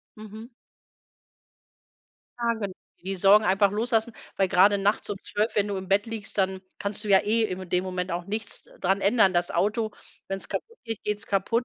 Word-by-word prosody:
Mhm. 215 +2 -10 1.9
Ja 235 0 +1
gen 200 -4 -4 0.3
die 195 +1 -3
Sorgen 200 +3 +5
einfach 195 +1 +4
loslassen, 225 +2 0 0.2
weil 195 - +2
gerade 195 +3 +5
nachts 205 +2 +1
um 200 - -4
12:00, 215 +2 -2
wenn 205 0 +2
du 200 -1 -2
im 190 -1 -6
Bett 200 +3 +2
liegst, 225 -3 -5
dann 190 0 +1 0.2
kannst 200 +1 -3
du - - -5
ja 195 -1 +7
eh 225 +2 +2
in 185 -3 -4
dem 180 +1 +1
Moment 185 -1 -3
auch 175 0 -3
nichts 210 +2 -4 0.2
dran 195 +2 +2
ändern. 200 -1 +4
Das 175 -1 0
Auto, 215 +5 0 0.4
wenn 195 0 -2
es - - -4
kaputt 465 +1 -5
geht, 225 -2 -5
geht 210 0 -1
es 225 - -5
kaputt. 215 +5 +1
200 Hz, 195 wpm, -26 LUFS, 190-220 Hz, 1.9 s, ja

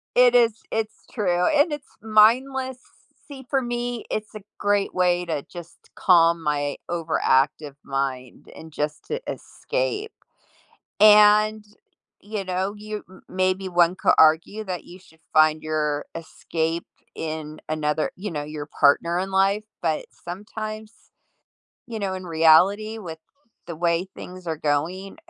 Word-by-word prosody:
It 245 0 +6
is 230 -2 +3
it's 220 -1 -3
true, 180 -6 0
and 300 0 +3
it's 295 -2 -8
mindless. 255 +5 +3 0.5
See, 270 -3 -10
for 270 -2 +1
me, 240 -1 -3
it's 215 0 -4
a 210 -2 -9
great 205 -1 0
way 180 -1 +2
to 155 -4 -3
just 175 -1 -12
calm 170 -2 +4
my 145 -2 -1
overactive 150 -4 0
mind, 135 -2 -4
and 160 0 -11
just 150 0 -4
to 460 +2 -3
escape, 445 -4 -3 0.9
and, 210 0 +6 0.6
you 205 -1 -5
know, 185 +2 -2
you 210 0 -7
m 185 - -16
maybe 185 0 0
one 175 0 +3
could - - +3
argue 160 +7 +4
that 180 -3 -5
you 180 - -13
should 160 -3 -22
find 155 0 +4
your 150 -2 -1
escape 165 0 -3 0.3
in 155 -1 -5
another, 155 0 0
you 200 0 -6
know, 145 -2 -3
your 150 0 -7
partner 170 +4 +4
in 190 +1 -3
life, 195 +2 +2 0.2
but 160 -2 0
sometimes, 215 +4 -7 1.0
you 230 -2 -6
know, 195 -2 -2
in 185 0 -7
reality 180 +7 +4
with 165 -5 -8 0.5
the 170 -2 -6
way 170 +2 0
things 180 -1 -10
are 160 - -2
going, 165 +7 -2
185 Hz, 140 wpm, -23 LUFS, 160-215 Hz, 1.0 s, It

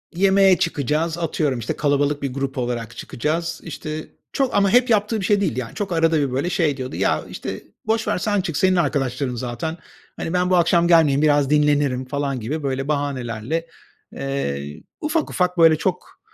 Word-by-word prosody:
yemeğe 195 0 +5
çıkacağız, 155 +2 -1
atıyorum, 150 -6 -1
işte, 115 - -3
kalabalık 145 0 +1
bir 135 -2 -3
grup 135 0 -3
olarak 120 -2 -3
çıkacağız. 165 +5 -3
İşte, 155 -1 -6 0.3
çok 270 -3 0
ama 200 -1 +4
hep 245 +3 +4
yaptığı 215 0 +2
bir 190 - -2
şey 205 0 +3
değildi. 130 - 0
Yani, 115 - -6
çok 200 -2 -3
arada 165 -1 +3
bir, 140 -3 0
böyle, 140 +7 -1
şey 155 -6 +1
diyordu: 130 0 -5
"Ya, - - 0
işte, - - -6 0.2
boş 220 0 0
ver, - - +1
sen 205 +1 0
çık, 165 -5 -3
senin 185 0 +3
arkadaşların 135 -5 0
zaten. 125 +7 -4 0.4
Hani, 165 - -4
ben 180 0 +1
bu 185 - +4
akşam 170 0 +3
gelmeyeyim, 155 -4 +5
biraz 145 -2 +3
dinlenirim." 145 -3 +2
falan 140 -1 -2
gibi, 145 +8 -4
böyle, 135 0 -2
bahanelerle, 140 +1 -2 0.5
eee, 75 - -4 0.2
ufak 310 +1 0
ufak, 180 0 0
böyle, 165 -1 +6
çok, 180 +3 -3
150 Hz, 180 wpm, -22 LUFS, 135-180 Hz, 0.5 s, böyle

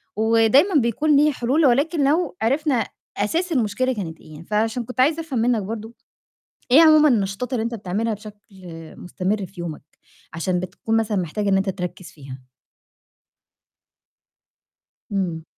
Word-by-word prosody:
ودايمًا 225 - +3
بيكون 290 +6 +1
ليه 300 +1 +4
حِلول 275 +5 +1
ولكن 280 +5 +2
لو 350 +4 0
عرفنا 270 +1 +1 0.3
أساس 330 - -1
المشكلة 255 0 0
كانت 170 -7 -6
إيه. 155 +1 -12
فعشان 220 +5 -1
كنت 250 +2 -9
عايزة 310 +5 +3
أفهم 275 -7 -3
منِك 235 -1 +1
برضه، 220 +2 -6 0.8
إيه 295 +6 +8
عمومًا 310 -1 +6
النشاطات 215 +1 -1
اللي 230 -3 0
أنت 235 0 -3
بتعملها 215 +3 -2
بشكل 210 0 -11 0.6
مُستمر 190 +2 -3
في 180 -1 -12
يومَك 165 -3 -6 0.5
عشان 180 +2 -1
بتكون 225 +5 -3
مثلًا 220 -2 0
محتاج 190 +4 -2
إن 195 - +3
أنت 195 +1 0
تركّز 180 -1 -6
فيها؟ 135 -3 -11 2.7
امم. 175 -5 -2
225 Hz, 140 wpm, -22 LUFS, 195-265 Hz, 2.7 s, إيه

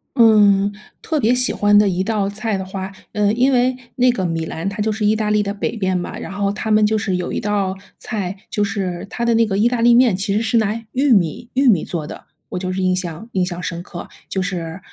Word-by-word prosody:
嗯， 205 -4 +5 0.3
特 315 -2 -1
别 235 0 +3
喜 250 0 +2
欢 205 0 +4
的 205 -1 +5
一 185 0 0
道 210 -2 0
菜 210 0 -2
的 190 - -5
话， 190 0 -6 0.2
呃， 210 -1 +2
因 255 +3 +3
为 250 +1 +2 0.2
那 250 0 +4
个 190 -6 -2
米 165 -1 -2
兰 165 +4 -5
它 205 +2 -3
就 215 +1 +1
是 210 0 -2
意 215 +1 +3
大 215 -1 -1
利 210 0 +2
的 200 0 -3
北 205 - -3
边 190 -2 0
嘛， 175 - -5
然 - - -7
后 200 0 -1
它 215 +1 -3
们 215 0 +5
就 215 +1 +2
是 190 -3 -1
有 180 - -3
一 - - -2
道 200 -2 -1 0.2
菜， 200 -4 -4
就 210 - 0
是 195 -3 -3
它 235 - -3
的 235 -1 +3
那 230 0 +4
个 195 -2 -2
意 230 - +4
大 245 -1 -1
利 240 0 +6
面， 240 -5 +5
其 195 +1 -1
实 215 - +1
是 230 +1 +1
拿 215 -1 +2 0.2
玉 270 +1 +2
米 195 +3 +1
玉 270 +1 +2
米 190 -9 +4
做 160 -4 -4
的， - - -10 0.2
我 - - -4
就 185 0 -3
是 190 - -2
印 185 0 +2
象 180 +4 -5
印 185 -2 +1
象 175 -1 -5
深 170 0 -4
刻， 175 - -8 0.2
就 190 - -2
是， 180 -2 -4
205 Hz, 275 characters per minute, -19 LUFS, 185-225 Hz, 0.3 s, 利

